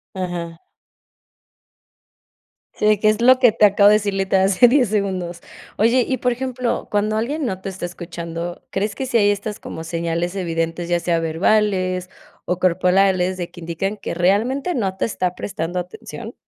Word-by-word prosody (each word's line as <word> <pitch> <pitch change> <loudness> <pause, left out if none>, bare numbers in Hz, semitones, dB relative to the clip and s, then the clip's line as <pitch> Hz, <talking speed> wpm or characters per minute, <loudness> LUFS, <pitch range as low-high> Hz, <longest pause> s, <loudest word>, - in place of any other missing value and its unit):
Ajá. 175 -3 -5 2.1
Sí, 215 0 +3
qué 215 - +4
es 215 +1 0
lo 255 +2 +6
que 250 -3 +5
te 215 - +4
acabo 205 0 +5
de - - +6
decir, 200 -2 -2
literal 190 0 +2
hace 195 +5 +5
10 250 -2 +3
segundos. 185 -4 -2 0.4
Oye, 235 +4 +3
y 260 - 0
por 250 +1 0
ejemplo, 250 0 -3
cuando 215 +1 0
alguien 280 +7 -2
no 190 -5 -3
te 195 - -5
está 190 -2 -6
escuchando, 170 -1 -6
¿crees 200 +1 -2
que 265 - -3
sí 250 - -5
hay 205 -2 +4
estas 205 +1 -2
como 160 - -7
señales 170 +2 -2
evidentes, 165 -1 -2
ya 175 0 +2
sea 170 -1 0
verbales 185 +2 +1 0.4
o 180 - -1
corporales, 185 +1 +2
de 175 -2 -5
que - - -12
indican 170 +4 -3
que 195 - -5
realmente 225 - +1
no 195 - -2
te - - 0
está 185 -5 -2
prestando 175 -2 -4
atención? 215 +6 -8
190 Hz, 170 wpm, -20 LUFS, 175-215 Hz, 2.1 s, lo